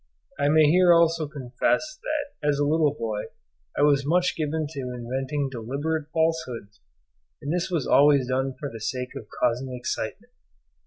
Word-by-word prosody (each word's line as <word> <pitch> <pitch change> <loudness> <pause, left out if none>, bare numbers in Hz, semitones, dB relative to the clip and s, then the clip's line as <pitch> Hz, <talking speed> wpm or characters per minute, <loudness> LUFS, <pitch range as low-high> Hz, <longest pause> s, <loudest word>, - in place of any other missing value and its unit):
I 140 - +2
may 155 +1 +5
here 175 +4 +5
also 165 -2 +3
confess 145 - -1
that 290 - -4
as 145 - +2
a 145 - +1
little 155 0 +3
boy 110 -5 -3 0.5
I - - +3
was 140 -1 +4
much 175 +5 +1
given 155 0 -1
to 135 -4 -6
inventing 135 +4 -3
deliberate 140 +6 -3
falsehoods, 160 - -2 0.6
and 145 +3 -3
this 180 +1 -1
was 165 -7 -1
always 140 -2 +5
done 130 +1 -1
for 150 - -4
the 115 -4 -9
sake 125 +3 -3
of 110 - -8
causing 125 +2 -1
excitement. 125 - -5
145 Hz, 160 wpm, -25 LUFS, 130-160 Hz, 0.6 s, may